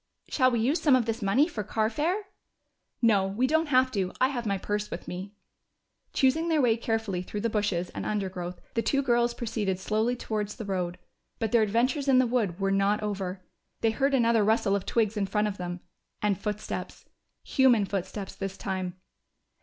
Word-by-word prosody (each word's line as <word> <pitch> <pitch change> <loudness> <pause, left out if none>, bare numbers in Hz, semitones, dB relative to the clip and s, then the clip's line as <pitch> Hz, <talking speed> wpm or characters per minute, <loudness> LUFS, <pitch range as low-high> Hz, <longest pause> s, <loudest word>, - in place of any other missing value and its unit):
"Shall 255 -3 +4
we 240 -2 0
use 270 +9 +1
some 285 -4 +5
of 250 -3 +2
this 230 0 -2
money 230 +10 +3
for 220 -12 -4
carfare?" 295 - 0 0.8
"No, 205 -4 +4
we 210 +7 0
don't 315 +4 +2
have 255 -2 +3
to. 190 -5 -1
I 260 - +4
have 240 -5 -3
my 200 -1 +1
purse 210 +2 -2
with 170 - -7
me." 190 +3 -6 0.8
Choosing 315 +6 +2
their 320 -2 +3
way 240 -5 +4
carefully 225 -5 -2
through 205 +3 -5
the 230 - 0
bushes 205 -5 0
and - - -5
undergrowth, 185 -4 -3
the 230 - +1
two 275 +4 +1
girls 240 -1 +2
proceeded 215 -5 -2
slowly 220 +5 0
towards 210 -3 -3
the 225 - -6
road. 180 -3 -2 0.4
But 225 -2 -2
their 235 - +5
adventures 245 +7 +1
in 265 -2 +5
the 255 - +5
wood 220 -7 0
were 195 0 +1
not 200 +2 +2
over. 190 -3 -3 0.4
They 225 - +3
heard 275 +5 +1
another 230 -3 +3
rustle 210 -1 +2
of 200 - -3
twigs 220 -2 +1
in 200 -1 0
front 210 +2 +1
of 205 -2 -5
them, 175 0 -4 0.4
and 210 -1 +1
footsteps. 210 +1 -5 0.4
Human 245 -6 +4
footsteps, 195 +1 -4
this 195 -1 -5
time! 185 -2 -3
215 Hz, 190 wpm, -28 LUFS, 195-245 Hz, 0.8 s, some